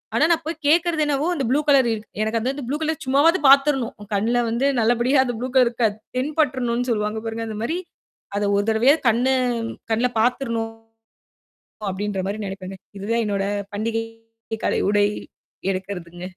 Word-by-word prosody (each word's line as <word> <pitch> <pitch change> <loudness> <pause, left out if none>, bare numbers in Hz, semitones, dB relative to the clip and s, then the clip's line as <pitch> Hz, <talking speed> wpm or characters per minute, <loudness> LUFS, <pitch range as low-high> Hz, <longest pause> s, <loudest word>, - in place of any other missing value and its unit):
ஆனா - - +3
நான் 330 - +2
போய்க் 320 -1 -5
கேக்குறது 330 0 +3
என்னவோ 290 +2 0
அந்த 275 - -2
புளு 280 +3 +3
கலர் 270 -4 +5
இரு 215 - -4 0.2
எனக்கு 220 +1 0
அந்த 270 +3 -2
புளு 290 +3 -1
கலர் 315 -1 -1
சும்மாவாவது 290 +7 +4
பாத்துர்ணும். 275 -3 +4
என் 205 - -15
கண்ணுல 230 +4 +1
வந்து 235 +4 0
நல்லபடியா 240 +4 +3
அந்த 245 - -2
புளு 255 +1 -3
கலர் 250 -2 +6
இருக்காது. 225 -3 0 0.2
தென்பட்ருணும் 255 -4 0
சொல்லுவாங்க 210 0 -1
பாருங்க. 225 0 -3
அந்தமாரி 225 +10 -3 0.6
அத 205 - 0
ஒரு 205 - +2
தடவையாவது 255 +8 +4
கண்ணு 250 +4 +2 0.6
கண்ணுல 240 +3 +2
பாத்துர்ணும் 230 -2 0 1.2
அப்பிடின்றமாரி 200 +1 -3
நினைப்பேங்க. 190 0 -7 0.2
இது 195 - -7
தான் 235 0 +2
என்னோட 200 -1 -1 0.3
பண்டிகை 225 +2 -1 0.6
கால - - +1
உடை 205 0 +4 0.7
எடுக்கிறதுங்க. 180 -2 -6
235 Hz, 155 wpm, -22 LUFS, 215-275 Hz, 1.2 s, கலர்